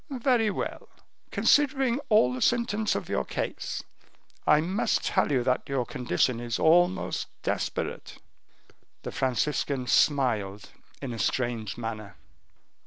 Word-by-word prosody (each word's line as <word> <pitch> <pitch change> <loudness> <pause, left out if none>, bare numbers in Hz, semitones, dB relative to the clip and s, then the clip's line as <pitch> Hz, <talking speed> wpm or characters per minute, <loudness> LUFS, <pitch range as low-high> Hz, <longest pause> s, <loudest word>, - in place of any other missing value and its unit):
"Very 245 -4 +2
well. - - -5 0.4
Considering 270 -3 +3
all 125 - +4
the 130 - -5
symptoms 225 -3 +1
of - - -3
your - - 0
case, - - -4 0.6
I 150 - +6
must 185 +8 0
tell 190 - +1
you 130 -3 +2
that 125 +2 0
your 135 -3 0
condition 120 +1 0
is 120 -1 -3
almost 175 +3 +2 0.2
desperate." - - -3 0.9
The - - -5
Franciscan 130 0 -1
smiled 115 -8 +1 0.3
in 125 -3 -4
a 115 - -6
strange 120 -5 -1
manner. 110 -4 -6
135 Hz, 120 wpm, -27 LUFS, -, 0.9 s, I